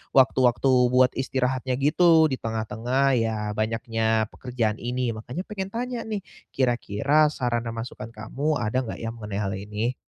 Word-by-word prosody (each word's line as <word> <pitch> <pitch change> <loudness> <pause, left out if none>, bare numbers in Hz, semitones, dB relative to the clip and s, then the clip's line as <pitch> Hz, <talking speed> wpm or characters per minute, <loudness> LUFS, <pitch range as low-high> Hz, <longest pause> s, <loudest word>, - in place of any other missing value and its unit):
waktu-waktu 130 0 +4 0.2
buat 125 0 +5
istirahatnya, 130 -1 -1
gitu, 160 +3 +5
di 130 - -2
tengah-tengah, 115 +5 0
ya, 115 -1 0 0.2
banyaknya 110 0 0
pekerjaan 120 -4 -2
ini. 125 0 -1
Makannya, 125 +10 -5
pengen 195 -2 -4
tanya 245 0 -3
nih, 210 -3 -3 0.3
kira-kira 135 +4 +2
saran 120 -5 -1
dan 115 - -4
masukan 115 -1 -6
kamu, 135 +8 -2
ada 120 +3 0
enggak 115 - -6
ya, 115 - -3
mengenai 105 -3 -6
hal 95 +1 -2
ini? 105 +5 -3
125 Hz, 150 wpm, -25 LUFS, 110-135 Hz, 0.3 s, buat